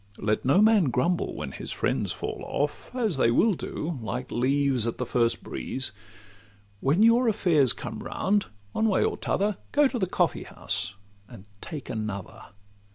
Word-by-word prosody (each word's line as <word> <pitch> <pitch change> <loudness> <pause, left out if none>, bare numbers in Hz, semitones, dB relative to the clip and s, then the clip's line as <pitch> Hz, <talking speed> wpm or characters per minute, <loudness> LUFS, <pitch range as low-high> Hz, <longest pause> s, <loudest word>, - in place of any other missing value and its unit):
Let 105 0 0
no 180 +11 +5
man 215 -5 +5
grumble 170 +7 0
when - - -5
his - - -6
friends - - -1
fall - - -5
off, - - -2
As 220 - 0
they 115 - +4
will 210 - +4
do 160 -3 -4
like 120 +4 -4
leaves 130 -1 +1
at 115 - -3
the 125 - -2
first 120 -1 +1
breeze: 130 -5 -4 0.9
When 150 - +3
your 235 +2 +5
affairs 170 - +4
come - - -6
round, 205 +1 0 0.2
one 220 - +1
way 195 - +3
or - - 0
t' - - -7
other, 200 0 +1
Go 290 0 +5
to 255 -2 -3
the 190 - +1
coffee - - 0
house, 100 - -3 0.3
and 110 -5 -12 0.2
take 150 -4 -7
another. 110 -5 -5
145 Hz, 170 wpm, -27 LUFS, -, 0.9 s, no